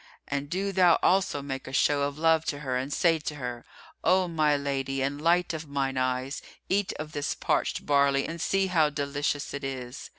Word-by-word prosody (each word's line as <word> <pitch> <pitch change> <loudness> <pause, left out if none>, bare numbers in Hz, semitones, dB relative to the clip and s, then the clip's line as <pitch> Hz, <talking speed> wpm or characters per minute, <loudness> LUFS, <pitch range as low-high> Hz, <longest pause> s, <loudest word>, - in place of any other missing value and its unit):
And 140 0 -3
do 195 +4 -1
thou 180 -3 +5
also 185 -6 +2
make 135 -1 -5
a - - -6
show 145 +1 +2
of 140 0 -1
love 160 0 +3
to 145 0 -3
her 130 -3 -2
and 130 +3 -2
say 165 +1 +3
to 150 0 -5
her, 125 -4 -5 0.4
'O 185 +1 +3
my 155 -3 +2
lady 135 -1 -2
and 140 +2 -2
light 175 +2 +2
of 160 -1 -5
mine 135 -1 -1
eyes, 130 +1 -1 0.3
eat 195 +1 +1
of 155 0 -7
this 145 -1 -2
parched - - -1
barley 140 -1 +3
and 165 0 -6
see 195 +2 +2
how 165 -5 +3
delicious 145 0 -2
it 140 - -5
is. 130 -1 -6
145 Hz, 200 wpm, -27 LUFS, 140-165 Hz, 0.4 s, thou